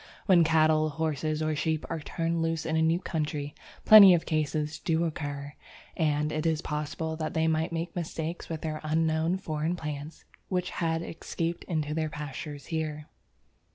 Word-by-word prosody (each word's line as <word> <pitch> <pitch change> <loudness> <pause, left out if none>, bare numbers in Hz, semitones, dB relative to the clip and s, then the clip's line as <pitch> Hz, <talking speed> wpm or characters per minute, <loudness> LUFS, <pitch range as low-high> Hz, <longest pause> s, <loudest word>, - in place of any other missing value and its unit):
When 180 -4 +6
cattle, 155 -1 +3
horses, 155 0 -1
or 155 0 0
sheep 155 +1 -1
are 165 - -3
turned 165 +2 -2
loose 165 0 -1
in 160 - -1
a 160 - +3
new 165 +2 +3
country, 150 -4 -3 0.3
plenty 200 -4 +10
of 165 - -2
cases 155 -1 -1
do 165 +1 +1
occur, 145 -3 -4 0.4
and 150 -2 +1
it 155 0 -2
is 160 0 0
possible 155 +1 -3
that 155 -1 -4
they 160 0 +2
might 160 0 +1
make 165 +1 -4
mistakes 165 -1 -4
with 160 -1 -4
unknown 160 +2 0
foreign 160 -2 -2
plants 150 -1 -7 0.2
which 180 -1 -1
had 165 -1 -1
escaped 170 0 -4
into 155 -3 -2
their 155 0 -1
pastures 150 -1 -7
here. 155 -2 -3
160 Hz, 160 wpm, -28 LUFS, 150-165 Hz, 0.4 s, plenty